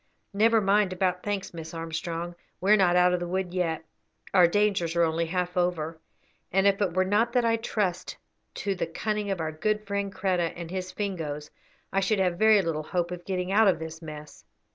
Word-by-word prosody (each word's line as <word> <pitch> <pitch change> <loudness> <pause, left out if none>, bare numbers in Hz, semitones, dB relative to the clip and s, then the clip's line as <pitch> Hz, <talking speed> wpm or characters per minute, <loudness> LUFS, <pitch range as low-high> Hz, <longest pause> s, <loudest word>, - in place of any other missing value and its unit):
"Never 225 +3 +4
mind 200 -1 +3
about 180 -1 0
thanks, 205 -3 -3
Miss 165 0 -8
Armstrong; 165 +1 -4 0.3
we 190 +3 +2
are - - +9
not 180 -4 +3
out 180 0 +5
of 180 - +1
the 175 - -4
wood 185 0 -2
yet, 165 -3 -1 0.5
our 180 -3 +7
dangers 190 -3 +1
are 170 - +4
only 165 0 0
half 180 +1 -2
over, 165 -3 -1 0.5
and 195 +2 +2
if 200 0 +3
it 180 -4 0
were 185 0 +3
not 215 +5 +2
that 245 -2 +3
I 230 0 +3
trust 200 -5 -2 0.4
to 200 - -1
the 185 - -3
cunning 210 +4 -2
of 195 -3 -1
our 160 -1 -2
good 210 +7 -1
friend 200 0 -2
Kreta 185 -3 0
and 170 -1 -7
his 185 0 -4
Fingoes 155 -7 -4 0.4
I 195 - +3
should 195 +2 +1
have 180 -2 0
very 215 -2 +6
little 165 -2 -1
hope 175 +2 -2
of 175 -1 -7
getting 185 -1 -2
out 215 +2 +5
of 185 -4 +4
this 160 0 -7
mess. 150 -2 -10
180 Hz, 210 wpm, -27 LUFS, 170-200 Hz, 0.5 s, are